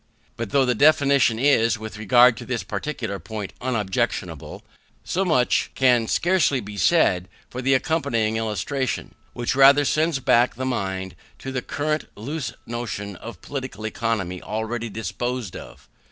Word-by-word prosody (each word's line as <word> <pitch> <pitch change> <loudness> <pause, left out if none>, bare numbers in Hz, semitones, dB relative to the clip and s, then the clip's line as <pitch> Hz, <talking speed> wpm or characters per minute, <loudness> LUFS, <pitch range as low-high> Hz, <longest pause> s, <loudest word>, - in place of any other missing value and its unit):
But 115 -3 -4
though 135 +2 +3
the 125 - +2
definition 140 -3 +4
is, 115 -3 +3
with 110 -1 -8
regard 120 +3 +5
to - - -7
this 120 -3 -2
particular 110 -2 -4
point, 105 -2 -6
unobjectionable, 115 -7 -2 0.4
so 190 - -1
much 145 -9 +2
can 125 -3 +3
scarcely 175 -5 +2
be 105 -2 -8
said 95 - +2 0.2
for 125 - -5
the 135 +1 +3
accompanying 115 -7 0
illustration; 115 +4 -2 0.2
which 120 +1 -2
rather 140 +2 +7
sends 155 +1 +1
back 125 -2 +3
the 130 +2 -4
mind 95 -7 -3 0.2
to 135 - -6
the 130 -1 -2
current 150 +3 -2
loose 140 +7 -4
notion 105 -4 -5
of 110 -5 -10
Political 130 -6 -6
Economy 105 -5 -2
already 110 +2 -3
disposed 120 0 -4
of. - - -11
120 Hz, 145 wpm, -23 LUFS, 110-135 Hz, 0.4 s, rather